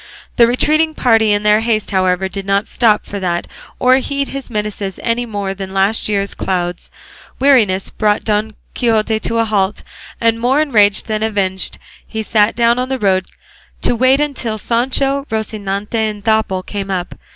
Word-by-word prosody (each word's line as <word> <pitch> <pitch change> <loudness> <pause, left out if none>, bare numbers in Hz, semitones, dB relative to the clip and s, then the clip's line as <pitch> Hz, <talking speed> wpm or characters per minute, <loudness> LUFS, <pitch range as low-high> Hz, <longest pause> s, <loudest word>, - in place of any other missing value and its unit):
'" - - -25
The 235 - +6
retreating 310 +6 +2
party 225 -3 +3
in 205 0 +1
their 210 0 +4
haste, 220 -2 -1
however, 185 -1 +1
did 195 +1 -6
not 200 +2 0
stop 220 -3 +2
for 200 - -5
that, 175 -2 -1 0.3
or 255 +1 +4
heed 280 +1 -2
his 275 -1 -6
menaces 210 -3 -4
any 240 +1 -1
more 200 -3 -3
than 195 0 -7
last 200 +3 +2
year's 200 -1 -1
clouds. 175 -2 -3 0.5
Weariness 225 -9 +3
brought 210 -1 0
Don 215 0 -1 0.2
Quixote 220 -2 +1
to 230 +1 -2
a 230 - +2
halt, 205 -2 -1 0.4
and 230 0 +2
more 255 +5 +2
enraged 215 -10 +3
than 215 -1 -2
avenged 195 -4 -1 0.3
he 220 -1 -4
sat 210 0 +2
down 235 +1 +3
on 255 +1 -2
the 265 - -1
road 190 -4 +1 0.6
to - - +2
wait 260 +3 +3
until 265 -7 -2
Sancho, 270 +5 0
Rocinante 210 -2 -3
and 215 -2 -2
Dapple 220 -4 +1
came 200 0 -5
up. 180 -2 -3
215 Hz, 175 wpm, -16 LUFS, 200-240 Hz, 0.6 s, The